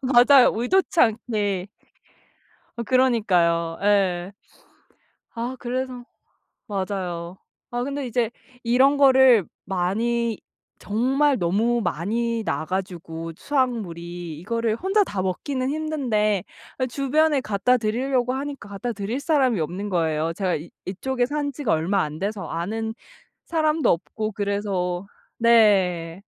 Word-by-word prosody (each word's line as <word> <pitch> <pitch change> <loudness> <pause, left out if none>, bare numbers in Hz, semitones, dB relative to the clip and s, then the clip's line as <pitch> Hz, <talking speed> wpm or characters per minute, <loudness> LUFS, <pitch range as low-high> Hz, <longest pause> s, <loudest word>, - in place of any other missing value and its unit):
맞아요. 255 0 +6
의도치 335 +8 +1
않게. 210 - +1 1.2
그러니까요. 180 -10 +2
예. 195 -3 +2 1.0
아 240 +3 -3
그래서 250 0 -4 0.6
맞아요. 185 -3 -4 0.3
아 240 0 -1
근데 280 +1 -3
이제 240 -1 0 0.3
이런 260 +4 +4
거를 265 - +6 0.2
많이 220 +5 -1 0.4
정말 265 +6 +1
너무 220 +7 +1
많이 230 +6 -1
나 160 - -2
가지고 170 -3 -4
수확물이 175 - -2
이거를 230 +4 -1
혼자 390 - +2
다 200 - -3
먹기는 255 +8 -2
힘든데 250 - 0 0.4
예 255 - +2
주변에 285 +4 +2
갖다 220 +3 +2
드리려고 250 +3 0
하니까 275 -5 -5
갖다 200 +5 -4
드릴 215 +4 -3
사람이 270 - +2
없는 185 +6 -3
거예요. 165 -3 0
제가 185 0 -1
이 155 +3 -7 0.2
이쪽에 245 +7 -1
산 290 +2 -2
지가 275 -4 -2
얼마 175 +5 +1
안 150 +1 -5
돼서 200 0 -3
아는 220 +7 -3 0.5
사람도 315 -1 +1
없고 215 +6 -2
그래서 200 -3 -2 0.3
네. 195 -7 +3
220 Hz, 245 characters per minute, -23 LUFS, 185-255 Hz, 1.2 s, 맞아요